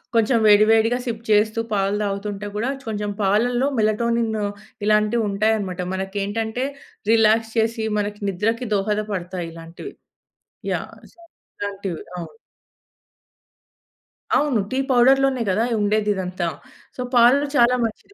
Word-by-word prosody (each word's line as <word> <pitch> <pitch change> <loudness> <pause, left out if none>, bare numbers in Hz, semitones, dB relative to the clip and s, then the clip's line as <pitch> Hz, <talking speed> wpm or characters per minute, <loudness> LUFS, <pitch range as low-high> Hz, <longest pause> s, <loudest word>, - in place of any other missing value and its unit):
కొంచెం 230 +2 +3
వేడి, 210 0 +7
వేడిగా 225 +2 +3
సిప్ 230 -2 -4
చేస్తూ 215 +1 +3
పాలు 195 0 +1
తాగుతుంటే 200 0 -4
కూడా, 225 +5 -1 0.2
కొంచెం 210 -1 -3
పాలలో 240 +6 +2
మెలటోనిన్ను 220 0 0 0.4
ఇలాంటివి 215 +2 +2
ఉంటాయనమాట. 200 -2 0
మనకేంటంటే 205 +5 -3 0.5
రిలాక్స్ 225 0 +3
చేసి, 225 0 +1
మనకి 205 0 -4
నిద్రకి 225 +6 -1
దోహదపడతాయి 195 -4 -2
ఇలాంటివి. 165 - -10 0.8
యాహ్! - - -5 0.2
సొ, - - -40 0.4
ఇలాంటివి, 200 -4 -4 0.2
అవును. 175 - -8 2.0
అవును. 285 -7 +1
టీ 260 - -1
పౌడర్‌లోనే 265 +1 +4
గదా 205 +5 +1 0.2
ఉండేదిదంతా. 200 -4 0 0.5
సో, - - -5
పాలు 245 +4 +5
చాలా 240 -1 +5
మంచిది, 225 - -7
215 Hz, 110 wpm, -22 LUFS, 200-230 Hz, 2.0 s, వేడి